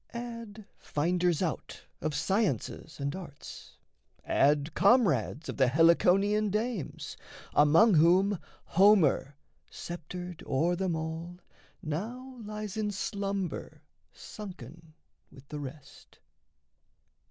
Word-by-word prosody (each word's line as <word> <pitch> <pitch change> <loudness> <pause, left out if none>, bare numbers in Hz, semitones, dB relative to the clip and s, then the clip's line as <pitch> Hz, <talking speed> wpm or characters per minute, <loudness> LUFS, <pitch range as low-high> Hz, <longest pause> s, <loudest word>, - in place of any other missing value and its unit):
Add 230 -3 -7
finders 175 +3 0
out 165 - -4 0.2
of 155 -1 -2
sciences 190 - -1
and 140 +3 -2
arts; 170 -7 -10 0.5
Add 145 +2 +2
comrades 195 - +3
of - - -5
the 130 -2 +4
Heliconian 180 +8 +4
dames, 215 - -3 0.4
Among 165 +9 +6
whom 180 +4 +4 0.2
Homer, 170 -7 +4 0.3
sceptered 175 +1 -7
o'er 165 +7 +1
them 185 -2 -1
all, 160 +2 -5 0.5
Now 240 - -5
lies 210 -1 -6
in 215 -1 0
slumber 200 -1 -4 0.3
sunken 165 - -11 0.4
with 135 0 -16
the 150 - -5
rest. 140 0 -11
175 Hz, 95 wpm, -30 LUFS, 155-205 Hz, 0.5 s, Among